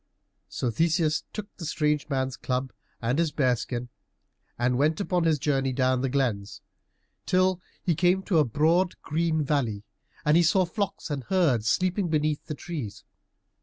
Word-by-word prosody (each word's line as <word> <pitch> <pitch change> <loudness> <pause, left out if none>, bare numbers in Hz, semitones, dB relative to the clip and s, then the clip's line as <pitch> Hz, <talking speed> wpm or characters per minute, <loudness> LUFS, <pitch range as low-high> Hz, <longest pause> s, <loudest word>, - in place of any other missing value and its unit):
So 120 - -2
Theseus 160 - +1
took 210 -1 -7
the 170 - -6
strange 150 -1 0
man's 130 -2 -1
club 130 0 -3 0.3
and 125 +6 +1
his 165 -3 +1
bear 130 -5 +2
skin 120 +1 -5 0.7
and 125 +1 +1
went 155 +2 +2
upon 180 -4 0
his 160 -2 +3
journey 135 -2 0
down 130 0 +2
the 135 - 0
glens, 120 -7 -1 0.7
till 185 0 +2 0.2
he 175 - +2
came 180 +4 +2
to 175 -4 +2
a - - +6
broad 160 - +2
green 160 0 0
valley, 125 -8 -1 0.4
and 150 +1 +4
he 170 - +6
saw 180 +3 +3
flocks 195 -3 -3
and 135 -4 -3
herds 140 - +2
sleeping 185 - +1
beneath 155 -1 0
the 150 - -4
trees. 140 - -6
150 Hz, 165 wpm, -27 LUFS, 130-170 Hz, 0.7 s, a